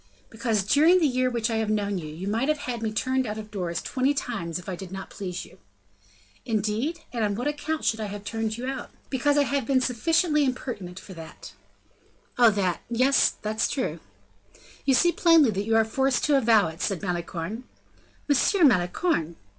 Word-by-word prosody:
"Because 225 -3 0
during 310 - +5
the 330 - +2
year 255 -2 +1
which 235 -1 -1
I 225 - 0
have 220 -1 -1
known 205 -2 0
you, 155 - -7
you 160 +6 -7
might 225 +6 0
have 305 0 +2
had 245 -5 -5
me 220 -1 -1
turned 260 +3 0
out 210 0 -4
of 215 -1 -8
doors 180 -4 -3
twenty 270 +2 0
times 170 - -3
if 180 - -10
I 185 - -3
did 185 0 -9
not 190 0 -7
please 180 -3 -5
you." - - -18 0.8
"Indeed; 225 +10 -1
and 235 -2 -1
on 205 -1 0
what 245 +6 -2
account 295 +1 -3
should 225 - +1
I 215 - -2
have 205 0 -7
had - - -5
you 220 - +1
turned 220 +2 -6
out?" 265 -2 -6 0.2
"Because 285 +2 +2
I 290 - +5
have 275 -3 -1
been 270 -2 +3
sufficiently 300 +5 +2
impertinent 240 -9 -4
for 190 - -11
that." 165 -2 -11 0.9
"Oh, 240 -2 +8
that, 190 -5 -1
yes, 255 +4 +4
that's 215 +1 0
true." 260 - -2 0.9
"You 270 - +4
see 345 +6 +4
plainly 330 -8 +5
that 200 0 -2
you 225 0 +1
are 225 0 +4
forced 265 +3 0
to 295 - +3
avow 225 -7 +4
it," 160 +3 -10
said 195 -5 -2
Malicorne. 180 +5 -4 0.6
"Monsieur 330 +6 +3
Malicorne!" 180 - +2
225 Hz, 200 wpm, -26 LUFS, 200-270 Hz, 0.9 s, Oh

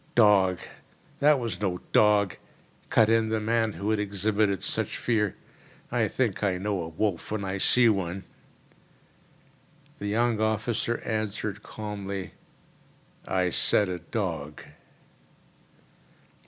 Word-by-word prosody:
"Dog! 100 -5 +5 0.6
that 150 0 +5
was 115 -7 -4
no 90 -3 -1
dog," 105 -3 +4 0.5
cut 110 - +5
in 115 0 +3
the 110 0 0
man 115 0 +1
who 105 +2 -2
had 110 - +1
exhibited 100 0 0
such - - -2
fear. 105 -4 0 0.6
"I - - +2
think - - -1
I 95 -3 +1
know 100 0 -2
a 80 - -4
wolf 85 +2 -2
when 105 -2 -2
I 95 +1 -3
see 125 +4 +5
one." 95 -3 0 1.8
The 105 - -4
young 115 +1 +1
officer 110 +2 0
answered 110 -1 -2
calmly: 100 -3 -6 0.9
"I 90 -1 +1
said 100 +2 +2
a 90 -1 -3
dog." 85 -6 -4
105 Hz, 120 wpm, -27 LUFS, 95-110 Hz, 1.8 s, Dog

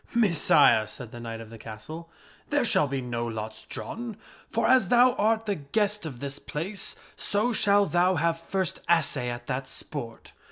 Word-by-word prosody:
" - - -23
Messire," 155 - +5
said 120 0 -8
the 120 - -9
knight 115 -1 -6
of 110 -1 -11
the 115 - -11
castle, 155 +11 -9 0.2
" - - -28
there 290 -3 +2
shall 150 - +3
be 135 -1 -2
no 120 -1 -3
lots 110 -1 -6
drawn. 230 -3 -6 0.3
For, 230 - 0
as 260 0 +5
thou 245 +1 +5
art 225 -1 +1
the 205 - 0
guest 200 +4 -1
of 130 -6 -8
this 140 +1 -4
place, 190 +7 -4 0.2
so 215 +4 0
shall 205 -2 +4
thou 180 0 +2
have 165 0 +1
first 185 +2 -2
assay 150 -7 +3
at 120 0 -6
that 130 +1 -3
sport." 120 -7 -6
165 Hz, 190 wpm, -27 LUFS, -, 0.3 s, Messire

